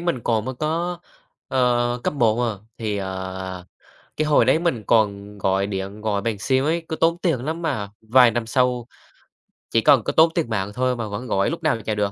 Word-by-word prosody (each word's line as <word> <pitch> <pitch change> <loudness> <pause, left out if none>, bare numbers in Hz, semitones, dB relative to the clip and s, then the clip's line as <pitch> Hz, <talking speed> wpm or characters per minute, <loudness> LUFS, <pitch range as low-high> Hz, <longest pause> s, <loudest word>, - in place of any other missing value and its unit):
mình 170 -8 -1
còn 110 -2 +1
mới 130 - -4
có, 165 +5 -2 0.5
ờ, 120 -2 +1
cấp - - 0
1, 115 -4 +2
ờ, 110 -5 -2 0.2
thì, 105 -3 -2
ờ, 95 -1 -5 0.5
cái 155 - 0
hồi 150 -5 +4
đấy 130 +6 +4
mình 165 -10 -1
còn 105 -2 +1
gọi 95 0 +1
điện 100 +1 -5
gọi 105 -2 -1
bằng 110 -2 -2
sim 130 +5 +1
ấy, 165 +2 0
cứ 160 - -3
tốn 165 +1 +2
tiền 160 -9 0
lắm 160 +3 -3
mà 115 -11 -2
vài 120 +2 +5
năm 115 0 -2
sau, 125 0 +1 0.8
chỉ - - +2
cần - - +5
có - - -2
tốn 160 +1 +6
tiền 165 -9 0
mạng 100 -2 -2
thôi 125 0 0
mà 115 -2 -4
vẫn 105 +5 -6
gọi 100 -2 +1
lúc 165 0 -5
nào 135 -8 +1
chả 110 - -1
được, 105 -1 0
120 Hz, 215 wpm, -22 LUFS, 105-145 Hz, 0.8 s, tốn